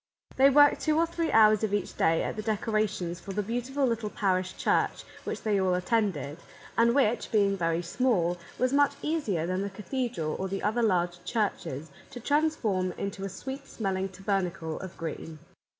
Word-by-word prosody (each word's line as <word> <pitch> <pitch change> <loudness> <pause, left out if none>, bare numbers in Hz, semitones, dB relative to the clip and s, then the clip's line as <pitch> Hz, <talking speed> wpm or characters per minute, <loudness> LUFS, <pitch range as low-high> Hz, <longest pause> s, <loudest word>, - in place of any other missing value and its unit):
They 270 +1 +6
worked 290 +1 +5
two 310 -1 +2
or 330 - +4
three 335 -1 -2
hours 215 -1 +6
of 205 -2 +1
each 205 - -3
day 165 0 +2
at - - -3
the 215 - -3
decorations 210 -5 -1
for 195 +3 -7
the 210 +1 -1
beautiful 245 +6 -1
little 230 -3 -1
parish 185 -3 -1
church - - +1 0.2
which - - -4
they 205 -3 +2
all 185 -1 +2
attended, 180 - -1 0.4
and 235 +1 +4
which, 245 -4 +1
being 200 -2 +3
very 165 -2 0
small, 175 -4 +1 0.2
was 255 +1 +1
much 285 0 +4
easier 255 - 0
than 185 +2 -1
the 200 - -2
cathedral 210 - -3
or 190 - -1
the 195 +1 -4
other 220 +4 +1
large 175 -5 +1
churches 180 - -2 0.2
to 245 - -8
transform 235 - +1
into 195 -1 -5
a - - -3
sweet 265 +8 -7
smell 195 -4 -2
ing 190 +1 -2
tabernacle 190 -4 -2
of 190 -2 -8
green. 165 -1 -6
205 Hz, 180 wpm, -28 LUFS, 180-240 Hz, 0.4 s, They